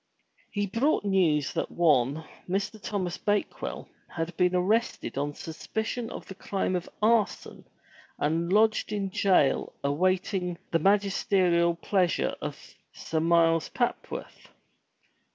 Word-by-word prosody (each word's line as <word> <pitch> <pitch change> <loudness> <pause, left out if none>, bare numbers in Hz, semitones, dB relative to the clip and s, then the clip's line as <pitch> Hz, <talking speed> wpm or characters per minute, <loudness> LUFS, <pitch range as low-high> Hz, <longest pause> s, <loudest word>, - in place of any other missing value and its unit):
He 205 -1 -1
brought 230 +5 +1
news 165 -8 +2
that - - -2
one, 150 -2 +2 0.3
Mr. 200 +3 -2
Thomas 185 -4 -3
Bakewell, 205 0 -2 0.2
had 165 +1 -4
been 180 +1 +2
arrested 215 +6 0
on 145 +1 -2
sus 160 -1 -9
picion 225 +2 -2
of - - -8
the - - -7
crime 190 -1 -2
of 180 - -3
arson 220 -2 +1 0.5
and 165 +4 0
lodged 215 +1 +3
in 200 -2 -2
jail 185 -8 +2
awaiting 180 +4 0
the 165 - +3
magis 200 +2 +2
239 180 -3 +3
MY - - +3
BOOK 170 - -9
HOUSE - - -18
terial - - -15
pleasure 185 -4 +1
of - - -7 0.2
Sir 160 - -3
Miles 165 0 +3
Papworth. 240 -1 -4
185 Hz, 140 wpm, -28 LUFS, 165-205 Hz, 0.5 s, lodged